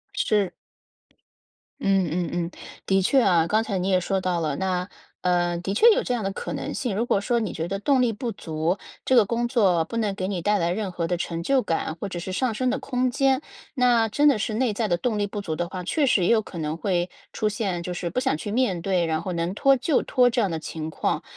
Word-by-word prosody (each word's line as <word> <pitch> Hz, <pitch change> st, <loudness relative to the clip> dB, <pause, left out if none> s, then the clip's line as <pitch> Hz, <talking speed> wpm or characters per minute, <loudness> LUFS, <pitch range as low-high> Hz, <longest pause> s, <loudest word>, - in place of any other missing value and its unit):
是。 205 Hz, -, +1 dB, 1.3 s
嗯 195 Hz, -2 st, +2 dB
嗯 175 Hz, +2 st, -1 dB
嗯。 175 Hz, 0 st, -2 dB, 0.3 s
的 195 Hz, 0 st, +3 dB
确 265 Hz, +8 st, +4 dB
啊， 175 Hz, -6 st, +3 dB
刚 215 Hz, +4 st, +2 dB
才 210 Hz, -4 st, -2 dB
你 185 Hz, +1 st, -1 dB
也 185 Hz, -1 st, +4 dB
说 190 Hz, +2 st, -1 dB
到 180 Hz, -2 st, 0 dB
了， 155 Hz, -4 st, -1 dB
那， 180 Hz, +1 st, -1 dB, 0.3 s
呃， 175 Hz, -1 st, +1 dB
的 180 Hz, +3 st, -3 dB
确 460 Hz, -, +6 dB
有 -, -, +2 dB
这 250 Hz, -, -1 dB
样 235 Hz, -3 st, -2 dB
的 195 Hz, -, -1 dB
可 -, -, -5 dB
能 -, -, -4 dB
性， 240 Hz, -8 st, -2 dB
如 225 Hz, +4 st, 0 dB
果 205 Hz, -, +2 dB
说 235 Hz, +4 st, 0 dB
你 215 Hz, -5 st, -2 dB
觉 165 Hz, -, -4 dB
得 195 Hz, +2 st, -3 dB
动 265 Hz, +4 st, +3 dB
力 240 Hz, -2 st, +2 dB
不 230 Hz, +2 st, -4 dB
足， 165 Hz, -1 st, -2 dB, 0.3 s
这 260 Hz, -, +3 dB
个 230 Hz, -4 st, +6 dB
工 235 Hz, +3 st, -1 dB
作 195 Hz, -9 st, +3 dB
不 230 Hz, -, -5 dB
能 215 Hz, -3 st, 0 dB
给 185 Hz, -1 st, -3 dB
你 190 Hz, -3 st, -2 dB
带 205 Hz, +4 st, +2 dB
来 170 Hz, 0 st, +1 dB
任 195 Hz, +1 st, -2 dB
何 170 Hz, -2 st, -2 dB
的 175 Hz, +1 st, -1 dB
成 170 Hz, -1 st, -3 dB
就 270 Hz, +5 st, +3 dB
感， 160 Hz, -5 st, -2 dB
或 185 Hz, -, -5 dB
者 180 Hz, -3 st, -5 dB
是 185 Hz, +2 st, -5 dB
上 245 Hz, +4 st, 0 dB
升 255 Hz, +3 st, 0 dB
的 260 Hz, -, 0 dB
空 255 Hz, 0 st, 0 dB
间， 270 Hz, +1 st, +2 dB, 0.3 s
那 245 Hz, -3 st, +3 dB
真 290 Hz, +7 st, +3 dB
的 280 Hz, -6 st, +5 dB
是 215 Hz, +1 st, -2 dB
内 235 Hz, 0 st, +1 dB
在 215 Hz, +1 st, -1 dB
的 175 Hz, -, +1 dB
动 220 Hz, +3 st, -1 dB
力 205 Hz, -, +1 dB
不 205 Hz, +1 st, -5 dB
足 160 Hz, -5 st, -3 dB
的 175 Hz, +2 st, -2 dB
话， 185 Hz, 0 st, -6 dB
确 290 Hz, -, +1 dB
实 210 Hz, -8 st, +3 dB
也 -, -, +3 dB
有 225 Hz, -, +4 dB
可 195 Hz, -, -10 dB
能 155 Hz, 0 st, -2 dB
会 175 Hz, -1 st, 0 dB, 0.2 s
出 215 Hz, -, 0 dB
现， 195 Hz, -5 st, -2 dB
就 180 Hz, +1 st, -4 dB
是 175 Hz, 0 st, -3 dB
不 250 Hz, -, -1 dB
想 255 Hz, -, 0 dB
去 205 Hz, -, -5 dB
面 215 Hz, -7 st, +1 dB
对， 180 Hz, -2 st, +1 dB
然 160 Hz, -1 st, -1 dB
后 185 Hz, -, -4 dB
能 170 Hz, +1 st, -2 dB
拖 275 Hz, +6 st, +4 dB
就 280 Hz, +3 st, +1 dB
拖 250 Hz, -1 st, +3 dB
这 240 Hz, -, -1 dB
样 200 Hz, -5 st, 0 dB
的 160 Hz, -, -2 dB
情 155 Hz, 0 st, -5 dB
况。 -, -, -1 dB
195 Hz, 280 characters per minute, -24 LUFS, 175-235 Hz, 1.3 s, 确